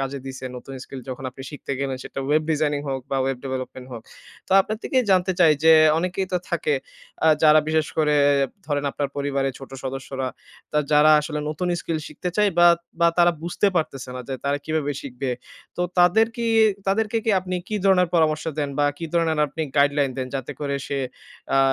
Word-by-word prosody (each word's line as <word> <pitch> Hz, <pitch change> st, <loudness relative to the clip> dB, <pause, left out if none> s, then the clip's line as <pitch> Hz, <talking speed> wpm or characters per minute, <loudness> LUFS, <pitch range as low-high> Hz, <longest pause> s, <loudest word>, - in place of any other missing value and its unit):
কাজে 135 Hz, +1 st, -3 dB
দিছে 130 Hz, 0 st, -7 dB
নতুন 135 Hz, +2 st, -9 dB
skill 135 Hz, -, -8 dB
যখন 130 Hz, +1 st, -6 dB
আপনি 135 Hz, -, -11 dB
শিখতে 145 Hz, -2 st, -6 dB
গেলেন 135 Hz, -2 st, -2 dB
সেটা -, -, -7 dB
ওয়েব 150 Hz, +2 st, +2 dB
ডিজাইনিং 150 Hz, -2 st, 0 dB
হোক 130 Hz, -1 st, -3 dB
বা 135 Hz, -, 0 dB
ওয়েব 135 Hz, +1 st, 0 dB
ডেভেলপমেন্ট 130 Hz, -1 st, -5 dB
হোক। 115 Hz, -2 st, -7 dB, 0.5 s
তো -, -, -1 dB
আপনার 215 Hz, +3 st, -2 dB
থেকেই 255 Hz, -2 st, +1 dB
জানতে 185 Hz, 0 st, +3 dB
চাই 160 Hz, -3 st, +7 dB
যে 160 Hz, -, +8 dB, 0.3 s
অনেকেই 185 Hz, +2 st, -2 dB
তো 180 Hz, -, +3 dB
থাকে 460 Hz, -1 st, 0 dB, 0.5 s
আ -, -, +5 dB, 0.2 s
যারা 155 Hz, 0 st, +7 dB
বিশেষ 155 Hz, -1 st, +1 dB
করে 150 Hz, -1 st, +3 dB, 0.5 s
ধরেন, 145 Hz, -1 st, -1 dB
আপনার 145 Hz, -1 st, -2 dB
পরিবারের 140 Hz, -1 st, -1 dB
ছোট 135 Hz, -, -11 dB
সদস্যরা, 130 Hz, 0 st, -4 dB, 0.4 s
তা 150 Hz, -, +2 dB
যারা 150 Hz, +1 st, +6 dB
আসলে 150 Hz, 0 st, -4 dB
নতুন 155 Hz, +4 st, -2 dB
skill 165 Hz, -1 st, -2 dB
শিখতে 180 Hz, -, -5 dB
চায় 210 Hz, -1 st, +3 dB
বা 175 Hz, -, +8 dB, 0.3 s
বা 170 Hz, -, +6 dB
তারা 175 Hz, 0 st, +5 dB
বুঝতে 175 Hz, +4 st, 0 dB
পারতেছে 135 Hz, -6 st, -2 dB
না -, -, -5 dB
যে 135 Hz, -, -2 dB
তারা 140 Hz, +1 st, 0 dB
কিভাবে 155 Hz, -2 st, -1 dB
শিখবে? 130 Hz, -1 st, -4 dB, 0.5 s
তো -, -, -3 dB, 0.2 s
তাদের 180 Hz, +6 st, +5 dB
কি 235 Hz, 0 st, -2 dB, 0.4 s
তাদেরকে 215 Hz, +3 st, +1 dB
কি 225 Hz, -, +2 dB
আপনি 185 Hz, 0 st, -5 dB
কি 215 Hz, -, -1 dB
ধরনের 180 Hz, -3 st, +4 dB
পরামর্শ 155 Hz, -2 st, +2 dB
দেন 145 Hz, -1 st, 0 dB
বা 145 Hz, -, +3 dB
কি 170 Hz, -, -5 dB
ধরনের 165 Hz, -2 st, +1 dB
আপনি 160 Hz, +3 st, -4 dB
গাইডলাইন 145 Hz, -1 st, +3 dB
দেন 130 Hz, -, -2 dB
যাতে 130 Hz, -2 st, -4 dB
করে 140 Hz, -1 st, -1 dB
সে 140 Hz, -, -2 dB, 0.6 s
আ -, -, +5 dB
150 Hz, 195 wpm, -23 LUFS, 135-175 Hz, 0.6 s, যে